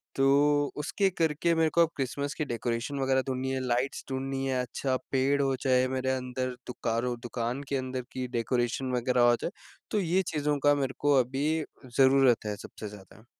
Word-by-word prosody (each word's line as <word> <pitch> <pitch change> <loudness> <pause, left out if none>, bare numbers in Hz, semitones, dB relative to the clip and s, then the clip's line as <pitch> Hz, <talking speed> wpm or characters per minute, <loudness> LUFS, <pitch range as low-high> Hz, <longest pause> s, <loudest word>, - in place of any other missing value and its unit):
तो 145 +2 +3
उसके 195 +6 +1
करके 165 -1 +1
मेरे 160 -1 +3
को 170 - +3
अब 165 - +4
क्रिसमस 140 +2 -2
की 155 - -3
डेकोरेशन 120 +2 -2
वगैरह 135 0 +2
ढूँढनी 130 0 -2
है, 130 - -1
लाइट्स 125 +3 -1
ढूँढनी 135 0 -2
हैं, 130 -1 0
अच्छा 130 +2 -2 0.2
पेड़ 135 +1 +2
हो 135 -1 +1
चाहे 130 0 +2
मेरे 130 0 -1
अंदर 130 0 -2 0.2
दुकारओ 120 0 -1
दुकान 120 +3 -3
के 140 - 0
अंदर 130 0 -3
की 130 -1 -3
डेकोरेशन 120 +2 0
वगैरह 125 0 +1
हो 120 - +5
जाए, - - -2 0.4
तो 215 - +2
ये 185 0 +2
चीज़ों 150 -1 +1
का 145 0 +5
मेरे 135 -2 -1
को 145 0 +3
अभी 135 +4 0 0.5
ज़रूरत 130 -3 +5
है 105 -1 -2
सबसे 105 +2 -9
ज़्यादा। 105 +2 -14
130 Hz, 185 wpm, -29 LUFS, 125-145 Hz, 0.5 s, हो